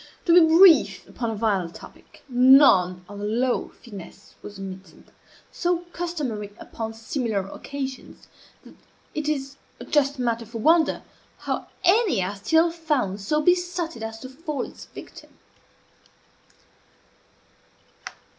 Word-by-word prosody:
To 335 - +4
be 355 - +9 0.2
brief 365 -3 +6
upon 235 -2 -4
a 225 - -3
vile 205 -5 0
topic, - - -15
none 245 -9 +5
of 205 +1 -9
the 205 - -4
low 240 +4 0 0.2
finesse 200 -3 -12
was 205 - -10
omitted, 190 -3 -10 0.4
so 350 -1 -1
customary 280 -13 -4
upon 225 -1 -7
similar 225 -4 -3
occasions 270 +4 -7 0.4
that - - -14 0.4
it 305 -1 -2
is 275 -2 -3 0.2
a - - -8
just 285 -1 +1
matter 235 -2 -2
for 230 +1 -7
wonder 320 +7 +3 0.3
how - - -4 0.2
any 365 - +3
are 195 +3 -4
still 320 +12 +2
found 295 - -2
so 300 +10 0
besotted 355 -5 0
as 225 0 -5
to 260 - -8
fall 300 +2 -5
its - - -12
victim. - - -13
255 Hz, 125 wpm, -24 LUFS, 205-310 Hz, 0.4 s, be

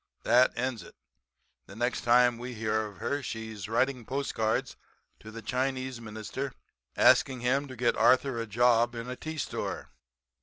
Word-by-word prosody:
That 125 +2 +5
ends 125 -2 -2
it. - - -14 0.7
The 95 - -12
next 120 +3 -1
time 120 0 +4
we 125 0 -6
hear 110 0 -1
of 100 -2 -13
her 140 +8 -2
she 110 -3 -5
is 105 -1 -7
writing 125 +2 +1
postcards 115 -4 -1 0.4
to 110 - -11
the 115 +1 -9
Chinese 130 +1 -2
Minister 115 +5 -5 0.4
asking 130 -2 +4
him 135 +4 +1
to 130 - -9
get 120 0 +1
Arthur 130 -2 +3
a 115 - -5
job 120 +2 +3
in 115 +1 -5
a 125 - -4
tea 155 +4 -7
store.' - - -4
120 Hz, 165 wpm, -29 LUFS, 110-130 Hz, 0.7 s, That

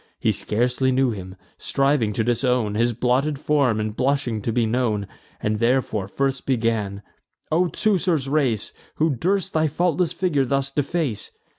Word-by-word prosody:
He - - +2
scarcely 125 +4 0
knew 130 -1 +2
him, 95 -3 -7 0.2
striving 135 -5 +1
to 110 - 0
disown 120 -2 +1
His 115 +3 +2
blotted 125 +5 +1
form, 140 -6 +1
and 105 0 -3
blushing 130 -4 0
to 115 - -2
be 115 0 +1
known; 110 -3 0 0.3
And 105 0 -1
therefore 115 -4 +1
first 135 +5 -2
began: 110 -5 0 0.5
"O 175 +3 +3
Teucer's 175 -8 +1
race, 135 -7 0 0.2
Who 160 +1 +2
durst 190 - 0
thy 155 0 +2
faultless 175 +2 +1
figure 165 -7 +1
thus 135 +1 -1
deface? 145 -4 -2
130 Hz, 150 wpm, -23 LUFS, 110-145 Hz, 0.5 s, O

